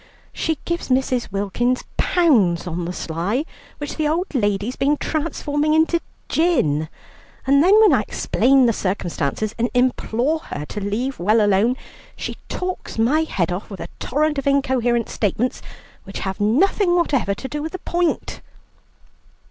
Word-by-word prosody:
She 320 -1 -1
gives 340 -3 -3
Mrs. 255 -2 0
Wilkins 205 +6 0
pounds 225 - +3
on 175 0 -3
the 175 - -3
sly, 180 - -2 0.3
which 290 -1 -6
the 310 -1 +1
old 335 +4 -1
lady's 205 0 0
been 290 +2 +1
transforming 305 -1 -1
into 325 +2 +3 0.3
gin, 160 - +1 0.6
and 280 +2 +5
then 400 +5 +6
when 435 -2 +6
I - - +4
explain 265 0 +2
the 230 - +3
circumstances 185 0 -2
and 240 +2 +1
implore 250 +3 +1
her 150 - -6
to 210 - -4
leave 230 +7 -2
well 210 +6 +3
alone, 210 +4 +3 0.4
she - - -5
talks 365 -8 -4
my 255 +8 +3
head 180 - -1
off 180 +6 -4
with 195 -3 -8
a - - -6
torrent 300 0 0
of 275 - -4
incoherent 255 -4 +2
statements, 220 +4 -1 0.4
which 195 - -7
have 190 +1 -3
nothing 350 - +3
whatever 275 - +1
to 265 - -6
do 295 +2 -4
with 315 +3 -5
the - - -3
point." 345 -1 -1
255 Hz, 155 wpm, -21 LUFS, 205-310 Hz, 0.6 s, then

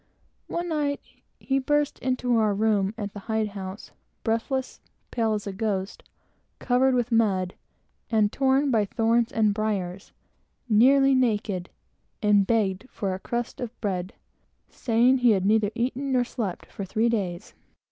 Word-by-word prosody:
One 345 +1 -3
night, 290 -3 -1 0.4
he 270 0 0
burst 295 +2 0
into 250 -1 0
our 215 -2 +2
room 210 -1 +1
at 205 -2 -5
the 205 - -7
hide 220 -1 0
house, 195 0 -8 0.3
breathless, 245 +4 -2 0.3
pale 225 -2 +1
as 205 - -5
a 200 - -4
ghost, 195 -1 -3 0.6
covered 255 +1 +2
with 245 -1 0
mud, 195 -5 +2 0.6
and 215 -3 +2
torn 270 +1 +2
by 220 -4 +3
thorns 230 +3 +1
and 215 -4 +2
briers, 200 -3 -3 0.6
nearly 270 +5 +5
naked, 210 -8 0 0.5
and 205 -2 +3
begged 215 0 0
for 195 -2 -3
a 185 - -5
crust 240 +5 -4
of 245 -1 -6
bread, 185 -3 -3 0.6
saying 245 +2 +2
he 245 -3 +5
had 190 -2 0
neither 210 0 +3
eaten 260 +3 -1
nor 250 -1 +3
slept 220 -7 -4
for 200 - -7
three 220 +5 0
days. 195 -6 -2
225 Hz, 145 wpm, -26 LUFS, 200-250 Hz, 0.6 s, nearly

